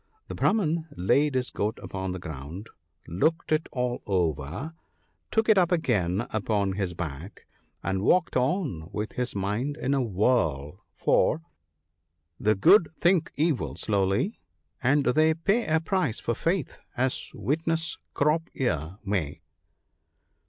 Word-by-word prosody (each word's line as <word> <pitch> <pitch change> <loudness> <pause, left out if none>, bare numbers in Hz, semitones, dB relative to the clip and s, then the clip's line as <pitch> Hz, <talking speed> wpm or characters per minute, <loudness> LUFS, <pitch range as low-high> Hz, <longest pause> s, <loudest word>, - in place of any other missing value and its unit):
" 435 - -41
The - - -4
Brahman 165 -6 +1
laid 140 +10 +2
his 130 -1 0
goat 105 +2 -2
upon 95 -1 -4
the 90 - -4
ground, 80 +5 -8 0.4
looked 160 - 0
it 155 +1 +1
all 125 -1 -2
over, 85 - -1 0.6
took 220 -1 +1
it 215 -3 +6
up 180 -1 +2
again 105 - +1
upon 105 -2 0
his 95 -3 -2
back, 80 +3 -7 0.4
and 95 -1 -1
walked 180 - +2
on 130 - 0
with 105 +1 -3
his 125 -3 -3
mind 105 +9 -1
in 140 -2 0
a 135 - +2
whirl; 95 - 0
for 160 - +2 0.3
— 80 +2 -52
" 85 +1 -51
The 110 - +5
good 165 - +6
think 175 -2 +2
evil 155 -2 0
slowly, 100 - 0 0.4
and 140 +3 +3
they 155 +4 +4
pay 205 +8 +1
A 160 +1 +3
price 160 - -1
for 115 - -1
faith 165 +3 -1
— - - -30
as 130 +1 0
witness 165 +3 -1
' - - -50
Crop 150 +3 +1
ear 90 - -1
' - - -32
may." 85 -7 -2
120 Hz, 150 wpm, -27 LUFS, -, 0.6 s, it